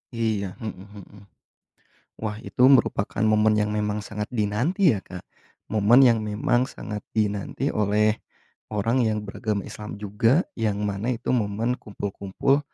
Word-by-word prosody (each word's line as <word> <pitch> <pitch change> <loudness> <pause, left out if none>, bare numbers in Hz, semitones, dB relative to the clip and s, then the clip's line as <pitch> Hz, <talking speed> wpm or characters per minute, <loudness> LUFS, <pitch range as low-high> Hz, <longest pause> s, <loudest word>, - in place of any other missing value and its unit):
Iya, 105 -5 -1
mhm 110 - -2 0.3
mhm. 100 0 -16 1.0
Wah, 105 -1 -3
itu 125 - +3
merupakan 120 -6 +3
momen 110 0 +4
yang 105 0 +1
memang 105 0 -1
sangat 105 0 -5
dinanti 125 - +1
ya, 105 - -1
Kak. 90 -2 -10 0.5
Momen 110 +5 +6
yang 115 -3 +5
memang 110 +4 0
sangat 105 -5 -6 0.2
dinanti 105 -2 -1
oleh 105 +1 +2 0.5
orang 115 +4 0
yang 105 -1 -1
beragam 105 0 -3
Islam 105 -1 -8
juga, 105 - +2 0.2
yang 105 -2 0
mana 105 +5 -1
itu 115 - -3
momen 115 +1 0
kumpul-kumpul 100 +6 -1
105 Hz, 135 wpm, -25 LUFS, 105-115 Hz, 1.0 s, Momen